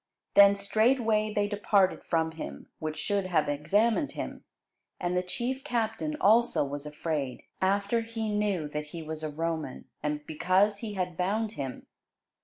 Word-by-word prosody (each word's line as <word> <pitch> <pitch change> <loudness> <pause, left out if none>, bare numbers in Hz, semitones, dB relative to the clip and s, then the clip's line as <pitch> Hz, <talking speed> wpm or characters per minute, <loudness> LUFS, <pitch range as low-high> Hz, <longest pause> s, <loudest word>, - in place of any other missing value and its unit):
Then 200 0 +8
straightway 215 +1 +2
they 205 -1 +1
departed 205 -2 +2
from 160 -1 0
him 160 - -7
which 155 -1 -3
should 200 -2 0
have 170 -4 +2
examined 205 - +1
him: - - -6 0.6
and 175 0 -1
the 180 - +3
chief 245 +8 -3
captain 240 +3 -1
also 225 -6 +4
was 145 +1 -5
afraid, 150 -4 -3 0.2
after 200 +4 +2
he 225 -1 -3
knew 200 -7 0
that 150 0 -3
he 160 +2 -8
was 155 0 -5
a 155 - -2
Roman, 160 -2 -3 0.2
and 150 0 -2
because 190 +6 +2
he 210 -2 -5
had 180 -3 -2
bound 210 +4 0
him. 135 - -6
195 Hz, 155 wpm, -29 LUFS, 155-215 Hz, 0.6 s, Then